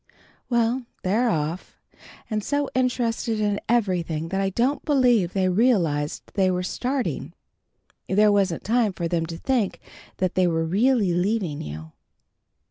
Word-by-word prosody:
Well, 240 Hz, +1 st, +1 dB, 0.2 s
they're 220 Hz, +6 st, +2 dB
off, 160 Hz, -1 st, -3 dB, 0.5 s
and 215 Hz, -2 st, -2 dB
so 285 Hz, +3 st, 0 dB
interested 240 Hz, -3 st, 0 dB
in 205 Hz, -1 st, 0 dB
everything 175 Hz, -8 st, 0 dB
that 195 Hz, +2 st, -1 dB
I 195 Hz, -, +1 dB
don't 250 Hz, +9 st, 0 dB
believe 245 Hz, -, +3 dB
they 190 Hz, -1 st, +1 dB
realized 180 Hz, -, +1 dB
they 190 Hz, -2 st, +2 dB
were 180 Hz, 0 st, -1 dB
starting. 255 Hz, +7 st, -2 dB, 0.8 s
There 210 Hz, +2 st, +4 dB
wasn't 195 Hz, -5 st, +1 dB
time 225 Hz, -2 st, +1 dB
for 170 Hz, -1 st, -3 dB
them 165 Hz, -1 st, -1 dB
to 165 Hz, 0 st, -6 dB
think 240 Hz, -1 st, -1 dB, 0.4 s
that 185 Hz, -1 st, 0 dB
they 185 Hz, -1 st, +3 dB
were 165 Hz, -1 st, 0 dB
really 205 Hz, +2 st, +2 dB
leaving 180 Hz, -4 st, -1 dB
you." 80 Hz, +2 st, -8 dB
200 Hz, 140 wpm, -24 LUFS, 175-235 Hz, 0.8 s, There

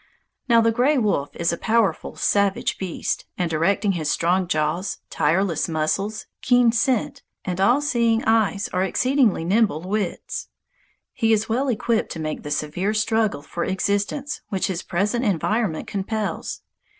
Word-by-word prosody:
Now 230 Hz, -1 st, +6 dB
the 225 Hz, 0 st, +3 dB
gray 255 Hz, +6 st, +2 dB
wolf 200 Hz, -, +1 dB
is 170 Hz, 0 st, 0 dB
a 170 Hz, -, -4 dB
powerful, 220 Hz, -6 st, +1 dB
savage 200 Hz, -1 st, +1 dB
beast, 185 Hz, -3 st, -3 dB
and 175 Hz, -2 st, -1 dB
directing 195 Hz, +6 st, +1 dB
his 160 Hz, -5 st, -2 dB
strong 180 Hz, +4 st, +1 dB
jaws, 170 Hz, +3 st, -1 dB
tireless 170 Hz, +2 st, +1 dB
muscles, 195 Hz, +7 st, -1 dB, 0.2 s
keen 245 Hz, -2 st, +4 dB
scent, 235 Hz, +1 st, 0 dB, 0.2 s
and 185 Hz, 0 st, -2 dB
all 245 Hz, +8 st, +4 dB
seeing 235 Hz, -5 st, +1 dB
eyes 215 Hz, -2 st, +2 dB
are 185 Hz, -, +1 dB
exceedingly 245 Hz, -, +2 dB
nimble 200 Hz, -4 st, +2 dB
wits. 200 Hz, 0 st, -3 dB, 0.7 s
He 225 Hz, -2 st, +1 dB
is 220 Hz, 0 st, +2 dB
well 255 Hz, +5 st, 0 dB
equipped 230 Hz, -2 st, 0 dB
to 165 Hz, -, -7 dB
make 155 Hz, -1 st, -3 dB
the 150 Hz, -, -7 dB
severe 155 Hz, +8 st, -1 dB
struggle 215 Hz, -6 st, +1 dB
for 170 Hz, +4 st, -4 dB
existence 205 Hz, +9 st, -1 dB
which 195 Hz, -4 st, -1 dB
his 185 Hz, -2 st, -2 dB
present 205 Hz, +7 st, -1 dB
environment 205 Hz, -2 st, 0 dB
compels. 210 Hz, +1 st, -3 dB
200 Hz, 150 wpm, -23 LUFS, 175-225 Hz, 0.7 s, Now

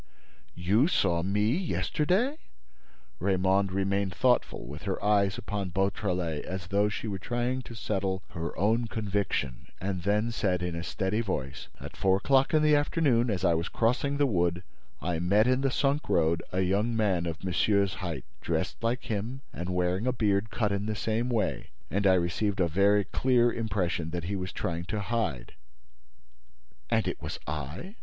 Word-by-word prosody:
You 100 Hz, -, +3 dB
saw 85 Hz, -, +2 dB
me 105 Hz, +6 st, +1 dB
yesterday?" 190 Hz, -, 0 dB, 0.8 s
Raymonde 95 Hz, +1 st, +2 dB
remained 95 Hz, 0 st, 0 dB
thoughtful, 125 Hz, +1 st, +1 dB
with 75 Hz, +3 st, -8 dB
her 95 Hz, -2 st, -1 dB
eyes 100 Hz, -2 st, +3 dB
upon 100 Hz, -2 st, -3 dB
Beautrelet, 90 Hz, -4 st, -1 dB
as 95 Hz, -1 st, -5 dB
though 100 Hz, +1 st, +2 dB
she 105 Hz, -, -4 dB
were 100 Hz, -2 st, -3 dB
trying 120 Hz, +3 st, -1 dB
to 120 Hz, -2 st, -10 dB
settle 95 Hz, -4 st, -2 dB
her 85 Hz, 0 st, -5 dB
own 115 Hz, +4 st, +2 dB
conviction, 100 Hz, -, -2 dB
and 95 Hz, -1 st, -2 dB
then 105 Hz, +5 st, +1 dB
said, 95 Hz, -6 st, 0 dB
in 90 Hz, -1 st, -2 dB
a 85 Hz, -, -3 dB
steady 95 Hz, +5 st, -1 dB
voice: 70 Hz, -, -4 dB
"At -, -, -9 dB
four 95 Hz, -1 st, +3 dB
o'clock 135 Hz, +5 st, +3 dB
in 155 Hz, -1 st, +4 dB
the 150 Hz, 0 st, +5 dB
afternoon, 145 Hz, -5 st, +2 dB
as 95 Hz, -3 st, 0 dB
I 85 Hz, -, +4 dB
was 85 Hz, +1 st, -1 dB
crossing 125 Hz, +5 st, +1 dB
the 145 Hz, -, +4 dB
wood, 90 Hz, -6 st, +1 dB, 0.4 s
I 85 Hz, -2 st, -1 dB
met 100 Hz, +6 st, +3 dB
in 130 Hz, +1 st, +2 dB
the 135 Hz, -, +2 dB
sunk 140 Hz, +3 st, 0 dB
road 80 Hz, +1 st, +2 dB
a 95 Hz, -, 0 dB
young 100 Hz, +5 st, +1 dB
man 95 Hz, -6 st, +1 dB
of 80 Hz, 0 st, -5 dB
monsieur's 100 Hz, +1 st, +2 dB
height, 85 Hz, -3 st, -4 dB, 0.2 s
dressed -, -, -2 dB
like 120 Hz, +2 st, 0 dB
him 115 Hz, +5 st, -3 dB
and 90 Hz, +2 st, -5 dB
wearing 90 Hz, +4 st, 0 dB
a -, -, +4 dB
beard 105 Hz, -3 st, +1 dB
cut 105 Hz, -3 st, 0 dB
in 100 Hz, +1 st, -1 dB
the 110 Hz, -, -1 dB
same 115 Hz, +3 st, -1 dB
way—and 100 Hz, -, -1 dB
I 95 Hz, -, +6 dB
received 95 Hz, +3 st, 0 dB
a 90 Hz, -, +3 dB
very 100 Hz, +5 st, +3 dB
clear 120 Hz, +1 st, +2 dB
impression 95 Hz, -7 st, -1 dB
that 85 Hz, 0 st, -3 dB
he 95 Hz, +4 st, -2 dB
was 95 Hz, -1 st, -4 dB
trying 85 Hz, 0 st, -3 dB
to 105 Hz, +4 st, -3 dB
hide." 100 Hz, -, -2 dB, 1.4 s
"And -, -, +2 dB
it -, -, -3 dB
was -, -, -4 dB
I?" 75 Hz, -, -5 dB
100 Hz, 175 wpm, -29 LUFS, 90-115 Hz, 1.4 s, I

